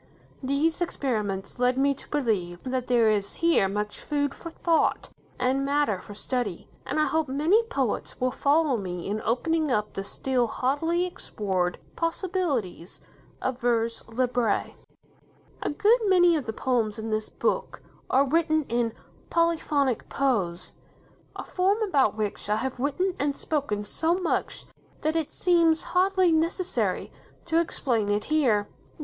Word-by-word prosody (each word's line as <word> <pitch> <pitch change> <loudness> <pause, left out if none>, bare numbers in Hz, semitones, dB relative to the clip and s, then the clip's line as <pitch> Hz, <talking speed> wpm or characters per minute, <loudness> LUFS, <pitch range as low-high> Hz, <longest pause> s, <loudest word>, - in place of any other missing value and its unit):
These 285 +6 0
experiments 215 - -2
lead 250 +1 +2
me 280 +1 +3
to 275 - -12
believe 200 -11 -1
that 255 -1 -2
there 235 -3 +4
is 200 -1 -1
here 335 -12 +3
much 210 +1 -3
food 285 -1 -1
for 335 - -8
thought 330 0 +1 0.3
and 260 +2 +1
matter 280 -8 +1
for 205 - -11
study, 230 -5 -3 0.2
and - - -1
I 305 - +4
hope 320 -1 0
many 310 - +3
poets 460 +2 -2
will 255 0 +1
follow 285 0 +2
me 180 -4 -5
in 210 +2 -2
opening 310 +7 0
up 210 -4 0
the 195 - -4
still 250 +4 -1
hardly 325 +9 0
explored 190 - -2 0.2
possibilities 330 - -2 0.4
of 260 0 -2
vers 230 -1 +1
libre. 240 -2 0 0.9
A - - -1
good 430 +10 +4
many 355 -3 +5
of 295 -5 -2
the - - -1
poems 225 -2 0
in 220 0 -4
this 215 0 -1
book - - -2 0.3
are 275 +2 +4
written 315 +1 +2
in 235 -1 0 0.4
"polyphonic 310 -6 +1
prose". 190 -11 0 0.6
A - - -5
form 385 +3 +1
about 275 - +2
which 210 -1 -3
I 210 - +3
have 255 +3 -3
written 360 +8 0
and 285 0 0
spoken 275 -10 -2
so 325 +10 +1
much 365 -2 -2 0.4
that 310 +1 0
it 325 -3 -1
seems 335 -3 +3
hardly 370 -1 +4
necessary 335 +3 0 0.3
to 330 -1 +2
explain 240 -10 0
it 205 0 +1
here. 245 -10 +2
265 Hz, 145 wpm, -26 LUFS, 220-325 Hz, 0.9 s, many